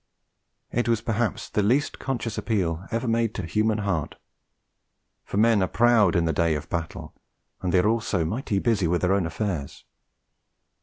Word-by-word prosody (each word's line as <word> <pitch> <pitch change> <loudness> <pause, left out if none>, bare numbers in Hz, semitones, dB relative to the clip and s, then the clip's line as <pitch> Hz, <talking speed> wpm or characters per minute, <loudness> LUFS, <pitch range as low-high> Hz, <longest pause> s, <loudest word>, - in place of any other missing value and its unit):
It 120 0 0
was 115 -2 +2
perhaps 115 0 -2
the 105 - 0
least 125 +8 +1
conscious 120 -5 -3
appeal 95 -5 -1
ever 115 +2 -2
made 115 -1 +1
to 95 - -3
human 110 +5 +1
heart; 100 -7 -2 1.1
for - - -5
men 110 -1 +4
are 95 - +2
proud 115 -5 +4
in 85 -1 +2
the 80 - +1
day 80 +1 +2
of 75 - -5
battle, 85 -2 -4 0.5
and 90 - -1
they 95 - +3
are 90 - +3
also 105 -6 0
mighty 105 +3 -2
busy 105 -3 +1
with 85 +1 +1
their 90 +1 +2
own 95 -4 +1
affairs. 80 -5 -4
105 Hz, 170 wpm, -25 LUFS, 85-115 Hz, 1.1 s, men